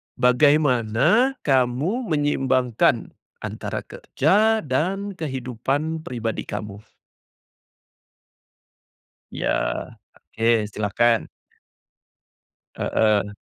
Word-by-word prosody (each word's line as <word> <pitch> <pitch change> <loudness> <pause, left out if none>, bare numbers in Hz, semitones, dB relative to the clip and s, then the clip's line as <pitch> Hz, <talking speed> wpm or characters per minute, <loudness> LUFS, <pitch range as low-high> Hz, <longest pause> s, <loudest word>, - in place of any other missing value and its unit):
Bagaimana 140 - +3
kamu 140 - +1
menyeimbangkan 135 -6 +1 0.3
antara - - -5
kerja 215 +8 +1
dan 185 +9 -1
kehidupan 145 - -3
pribadi 115 -3 -4
kamu? 105 -1 -6 2.5
Ya - - -3 0.9
oke, 115 -1 +2
silakan. 110 +3 +1 1.5
Heeh. 105 -2 +1
130 Hz, 60 wpm, -23 LUFS, 115-160 Hz, 2.5 s, Bagaimana